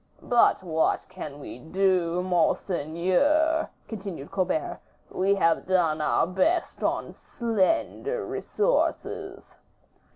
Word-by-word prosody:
"But 240 -5 +3
what 160 -3 0
can 155 -6 -8
we 135 - -9
do, 180 +2 +1
monseigneur?" 185 - +1 0.2
continued 195 -9 -7
Colbert, 185 -5 -1 0.3
"we 195 +2 +2
have 165 -4 +1
done 165 -5 +2
our - - +2
best 190 - 0
on - - -1
slender 235 - -1
resources." 480 +4 -2
185 Hz, 95 wpm, -26 LUFS, 165-225 Hz, 0.3 s, But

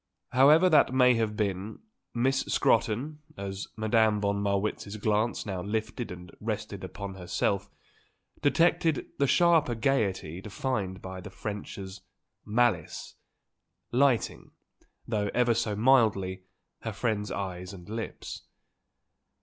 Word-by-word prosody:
However 150 +7 +6
that 155 -6 +5
may 125 -1 +6
have 110 -2 -1
been, 100 0 -2 0.3
Miss 130 +3 +1
Scrotton, 145 +8 +1 0.2
as 100 0 -5
Madame 110 -1 +3
von 100 0 0
Marwitz's 100 +1 -1
glance 110 +2 0
now 95 -3 -3
lifted 110 +4 -3
and 90 0 -10
rested 105 -2 -4
upon 95 +1 -6
herself, 95 +2 -1 0.7
detected 165 +1 +3
the 140 - +3
sharper 165 -6 +4
gaiety 100 - 0
defined 100 -3 -3
by 95 0 -6
the 100 - -8
French 105 +1 -6
as 95 -1 -8 0.4
"malice," 105 -7 0 0.8
lighting, 130 -2 +1 0.6
though 105 -2 0
ever 120 -1 +4
so 110 -2 -1
mildly, 105 -6 +3 0.3
her 110 - -5
friend's 105 -1 -1
eyes 90 -2 -4
and 90 -3 -11
lips. 110 +1 -6
105 Hz, 115 wpm, -28 LUFS, 95-120 Hz, 0.8 s, However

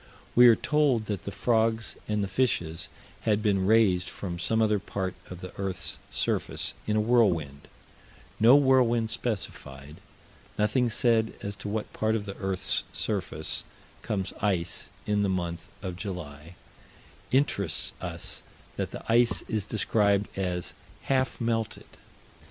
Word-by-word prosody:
We 125 0 +8
are 115 - +8
told 145 -7 +2
that 105 -3 -4
the 100 - -3
frogs 110 +2 +1
and 105 -1 0
the - - -1
fishes 90 -7 0 0.3
had 105 -1 +1
been 100 -3 +2
raised 100 -5 +4
from 85 -3 -5
some 110 +6 +1
other 105 -2 +3
part 95 -1 -3 0.2
of 90 -1 -8
the 90 - -8
earth's 95 -2 -1
surface, - - -1
in 105 - +1
a - - +3
whirlwind; 90 - +2 0.7
no 115 +5 +8
whirlwind 125 -5 +4
specified; 75 - -4 0.6
nothing 115 +4 +2
said 115 -1 +2
as 100 0 -4
to 100 +1 -6
what 105 +1 -3
part 110 0 +1
of 105 -2 -2
the 100 -1 -6
earth's 95 -1 0
surface - - -2 0.4
comes 95 -3 -2
ice, 90 -4 0 0.2
in 105 -1 +1
the 100 - +1
month 85 -2 -2 0.2
of 90 -2 -4
July 85 -5 -7 0.8
interests 100 - +1
us 85 -2 -3 0.4
that - - -1
the - - -8
ice 120 +1 +4
is 105 -3 -1
described 105 -2 +1
as 90 -2 -2 0.3
"half 130 -1 0
melted." 115 -2 -1
105 Hz, 140 wpm, -28 LUFS, 90-115 Hz, 0.8 s, We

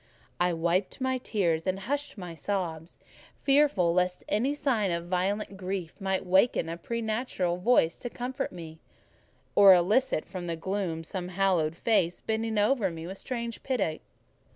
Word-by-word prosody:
I 175 0 +3
wiped 170 +3 0
my 260 0 0
tears 175 -9 0
and 190 +1 -1
hushed 285 +4 -3
my 180 -3 -7
sobs, 165 -2 -4 0.5
fearful 275 - +4
lest 180 0 0
any 255 +8 +1
sign 235 -9 +1
of 170 -1 -2
violent 195 +3 -1
grief 185 -1 -5
might 190 -1 -1
waken 190 -1 +3
a 165 - -3
preternatural 220 -3 -2
voice 180 -4 +3
to 245 - -5
comfort 255 +3 -4
me, 160 -2 -9 0.7
or 200 -2 +9
elicit 185 +1 +2
from 180 -1 -6
the 170 - -2
gloom 175 -1 -3
some 180 +2 -5
haloed 180 -4 +1
face, 175 -4 +1
bending 220 0 -2
over 210 -1 +2
me 165 -1 -7
with 190 +2 -7
strange 235 -2 -4
pity. 235 -12 -1
190 Hz, 155 wpm, -28 LUFS, 175-225 Hz, 0.7 s, or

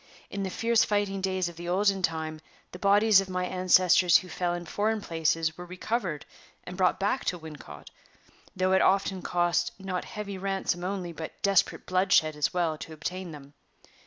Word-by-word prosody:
In 200 - -4
the 190 - -2
fierce 230 +4 +2
fighting 205 -2 -1
days 185 -1 0
of 170 -1 -9
the 175 0 -6
olden 195 +1 +2
time, 160 -2 -2 0.3
the 180 - -9
bodies 205 +1 +5
of 195 - -7
my 180 0 -1
ancestors 180 -1 +4
who 185 - -7
fell 175 0 -1
in 175 0 -6
foreign 215 +5 -1
places 165 -2 -1
were 180 - -7
recovered 180 -3 -3 0.4
and 180 - -8
brought 185 -1 +2
back 205 +7 0
to 180 - -1
Wincot, 150 - -11 0.6
though 185 0 +1
it 190 - +4
often 195 -1 +2
cost 175 0 0
not 190 -2 -4
heavy 200 -2 -6
ransom 190 -2 -2
only, 185 -2 -3
but 160 -1 -8
desperate 195 -2 +2
bloodshed 185 -4 +2
as 150 -1 0
well, 165 -4 -1
to 160 - -8
obtain 180 +4 -5
them. 145 -2 -12
180 Hz, 180 wpm, -28 LUFS, 170-195 Hz, 0.6 s, bodies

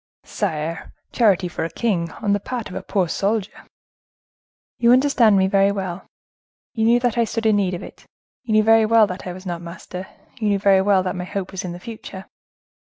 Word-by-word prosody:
"Sire!—charity 170 +5 -1
for 175 - -4
a 165 - -2
king, 175 -5 -1
on 200 -1 +2
the 205 - +1
part 240 +2 -5
of - - -8
a - - -4
poor 190 -3 0
soldier!" 200 +4 -2 1.1
"You 235 0 +4
understand 250 -6 +4
me 190 - +3
very 195 +1 +3
well; 190 -2 -5 0.7
you 220 -1 0
knew 235 +1 +4
that 240 -1 0
I - - +4
stood 230 +1 -3
in 215 -2 +4
need 190 -3 0
of 175 - -7
it; - - -13 0.3
you 235 -4 -3
knew 215 0 +5
very 225 0 +5
well 225 -1 +5
that 185 -1 -7
I - - -3
was 185 +2 -11
not 175 -2 -4
master; 180 +2 -8 0.3
you 215 - -1
knew 200 - +2
very 195 -1 +4
well 195 -1 +3
that 185 +1 -3
my 180 0 -4
hope 190 0 -5
was 190 0 -5
in 180 - -5
the 175 - -9
future. 210 -3 -9
200 Hz, 210 wpm, -21 LUFS, 185-220 Hz, 1.1 s, knew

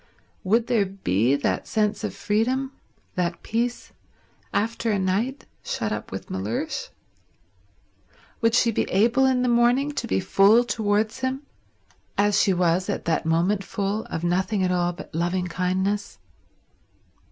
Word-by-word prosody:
Would 225 +4 +2
there 230 -5 +2
be 130 - +1
that 145 - -1
sense 210 -1 0
of - - -3
freedom, 255 +6 0 0.4
that 175 -1 -2
peace, 240 +2 -2 0.6
after 230 +2 -1
a 210 - +2
night 205 +9 -1 0.2
shut 110 -1 -2
up 105 - -4
with 95 - -7
Mellersh? 95 +5 -3 1.5
Would 230 0 +3
she 235 -1 +4
be - - -1
able 235 +7 +3
in 255 -1 +2
the - - +1
morning 245 +4 +3
to 285 -5 -4
be - - +1
full 200 +5 +5
towards 220 0 0
him, 260 +2 -2 0.7
as 205 0 +3
she 195 - +3
was 180 0 +1
at - - -3
that 165 -1 0
moment 180 +5 +1
full, 200 +2 -2
of 165 - -5
nothing 190 +3 +1
at 180 - +1
all 175 -1 +1
but 175 0 -11
loving 175 +3 0
kindness? 190 +3 -1
205 Hz, 145 wpm, -24 LUFS, 180-235 Hz, 1.5 s, full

